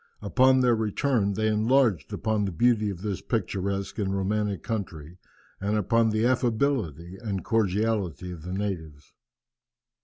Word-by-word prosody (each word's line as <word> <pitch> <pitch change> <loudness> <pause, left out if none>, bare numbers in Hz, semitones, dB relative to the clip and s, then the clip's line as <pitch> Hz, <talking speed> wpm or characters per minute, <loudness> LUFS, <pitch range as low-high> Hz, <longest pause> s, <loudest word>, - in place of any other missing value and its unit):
Upon 130 +5 +4
their 125 -1 +4
return 110 -1 0
they 110 +2 -1
enlarged 110 - +2
upon 110 -2 0
the 95 - -2
beauty 110 +3 +2
of 95 -1 -6
this 100 -3 -3
picturesque 100 -2 -2
and 100 -1 -1
romantic 100 -1 -1
country, 90 -6 -5 0.4
and 105 +2 0
upon 115 +3 +2
the 110 +1 +1
affability 115 - 0
and 100 -5 -3
cordiality 100 - 0
of 85 -3 -8
the 90 +3 -7
natives. 80 -7 -5
105 Hz, 140 wpm, -26 LUFS, 95-115 Hz, 0.4 s, Upon